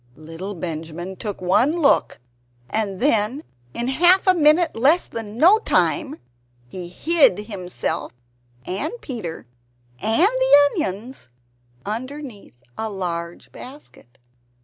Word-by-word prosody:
Little 165 +7 -8
Benjamin 165 +2 -6
took 205 -2 -6
one 230 - +3
look, 300 -5 +2 0.5
and 205 -4 -2
then, 250 +1 +1 0.3
in 240 - -3
half 350 +8 +4
a 370 - +5
minute 320 0 +3
less 290 +10 +3
than 220 -1 -7
no 365 - +6
time, 310 -9 0 0.5
he 175 +6 -8
hid 310 - +4
himself 180 -5 -4 0.5
and 190 - -3
Peter 215 - -6 0.5
and 225 - +3
the - - +4
onions 220 - -5 0.6
underneath 230 - -7 0.2
a 220 - -2
large 170 -4 -5
basket. 250 - -14
220 Hz, 110 wpm, -21 LUFS, 180-300 Hz, 0.6 s, no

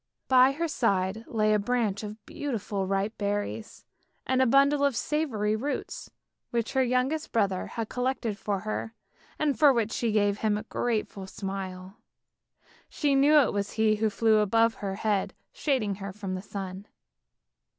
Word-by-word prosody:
By 260 +1 +6
her 335 +4 -1
side 210 - 0
lay 215 -1 +2
a 210 - +3
branch 215 -2 0
of 210 0 -8
beautiful 210 -8 -3
ripe 195 +3 -1
berries, 205 +2 -3 0.4
and 260 0 +2
a 260 - +4
bundle 280 +3 +4
of 280 -3 +2
savoury 230 -9 0
roots, 275 +7 -4 0.4
which 235 -1 -2
her 265 - +3
youngest 255 +5 0
brother 200 -5 0
had 230 -2 -4
collected 250 -3 -2
for 200 -1 -3
her, 215 +1 -4 0.4
and 295 -4 0
for 295 -2 +7
which 230 -4 0
she 230 0 0
gave 205 -1 +2
him 215 -1 +1
a 210 - -5
grateful 215 -4 -2
smile. 190 0 -6 0.9
She 290 -2 0
knew 285 +3 +5
it 255 - 0
was 200 0 -2
he 220 -1 +2
who 220 +1 +1
flew 220 +1 +3
above 225 +2 +3
her 195 -3 -4
head 205 -1 -1 0.2
shading 255 -9 0
her 195 0 -4
from 195 -1 -5
the 185 - -3
sun. 195 0 -7
220 Hz, 160 wpm, -28 LUFS, 200-255 Hz, 0.9 s, for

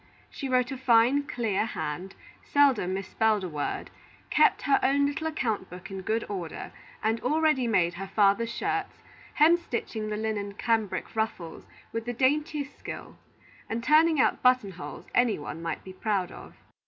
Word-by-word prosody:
She 275 - -5
wrote 255 0 +2
a 270 - -4
fine, 255 +3 +4
clear 225 -9 0
hand, 185 -3 -4 0.3
seldom 260 -11 +3
misspelled 210 +2 +1
a - - -2
word, 150 -3 -4 0.4
kept - - +4
her 280 - +4
own 280 +1 +3
little 315 +3 -2
account 225 -11 -2
book 180 +3 -10
in 190 -1 -5
good 220 +4 -1
order, 180 -5 -5 0.3
and 225 +1 +1
already 305 -2 +2
made 175 -6 +2
her 195 +3 -6
father's 205 +3 +2
shirts, 405 +9 -3 0.3
hemstitching 295 -9 +2
the 210 - -2
linen 210 -2 -3
cambric 220 -2 -1
ruffles 220 -7 -3 0.3
with 230 0 -3
the 245 - -2
daintiest 290 +3 0
skill, - - -8 0.5
and 230 +1 -2
turning 310 +3 +5
out - - +2
button 250 -6 +3
holes 180 -1 -9
any 245 -3 +3
one 150 +2 -7
might 165 -2 -4
be 190 - -10
proud 190 -2 -1
of. - - -12
225 Hz, 160 wpm, -28 LUFS, 195-270 Hz, 0.5 s, turning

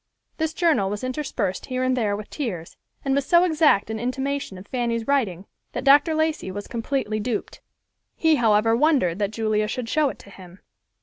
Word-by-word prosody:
This 320 0 -2
journal 310 - +2
was 205 +3 -4
interspersed 255 -8 -3
here 255 -1 -2
and 255 0 +2
there 215 -5 0
with 210 0 -8
tears, 190 - -5 0.3
and 270 - +1
was 280 0 +1
so 345 +5 +4
exact 310 - +3
an 220 - -3
imitation 265 -2 -3
of 185 - -11
Fanny's 235 -1 -2
writing 210 -10 0 0.3
that - - -3
Dr. 290 +3 +5
Lacey 315 -9 0
was 205 +2 -6
completely 230 -2 -2
duped. 225 0 -4 0.5
He, 320 -2 +3
however, 225 -1 +3
wondered 245 - +2
that 205 -1 0
Julia 215 -1 0
should 235 +2 -4
show 305 -2 +2
it - - -8
to 200 - -15
him. 185 -1 -14
240 Hz, 185 wpm, -24 LUFS, 205-280 Hz, 0.5 s, Dr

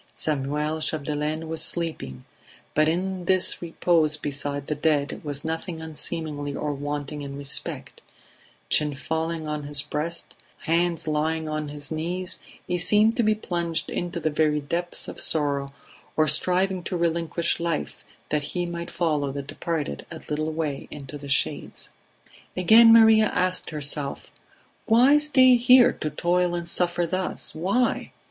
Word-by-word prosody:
Samuel 150 +1 -2
Chapdelaine 155 +1 -2
was 160 0 -2
sleeping; 155 - -2 0.5
but 155 0 +3
in 185 +2 -2
this 185 0 +2
repose 165 -2 +1
beside 145 -1 -2
the 150 - -2
dead 145 -1 0
was 145 -1 -4
nothing 160 +1 -4
unseemly 155 -2 -4
or 150 -1 -2
wanting 145 +1 -5
in 140 -1 -7
respect; 140 -1 -1 0.7
chin 150 -2 +2
fallen 160 +3 -3
on 150 0 -3
his 145 0 0
breast, 155 +3 -5 0.3
hands 170 0 0
lying 155 +1 -1
open 155 0 -2
on - - -8
his 145 0 -5
knees, 175 +3 -2 0.3
he 180 - -1
seemed 210 +5 +5
to 250 - +2
be 215 -1 +2
plunged 170 -5 -3
into 175 0 -3
the 155 -1 -1
very 150 0 +1
depths 170 +4 -3
of - - -7
sorrow 140 -3 +1 0.5
or 155 0 +3
striving 185 +5 +3
to 180 - -2
relinquish 170 0 -1
life 170 -2 -3 0.3
that 150 0 0 0.2
he 175 - 0
might 170 0 -5
follow 150 -5 -1
the 140 +1 -5
departed 145 - -4
a - - -8
little 155 +1 -2
way 155 -3 -3
into 145 -1 -9
the 145 -1 -8
shades. 135 - -1 0.7
Again 225 +5 +7
Maria 220 -1 +7
asked 185 0 0
herself: 145 -2 0 0.6
"Why 255 +6 +5
stay 260 -4 +5
here, 250 +1 +6
to 155 - -4
toil 175 +3 0
and 170 -1 -4
suffer 175 0 +1
thus? 185 +2 -3
Why? 195 +10 -1
160 Hz, 150 wpm, -25 LUFS, 150-175 Hz, 0.7 s, Again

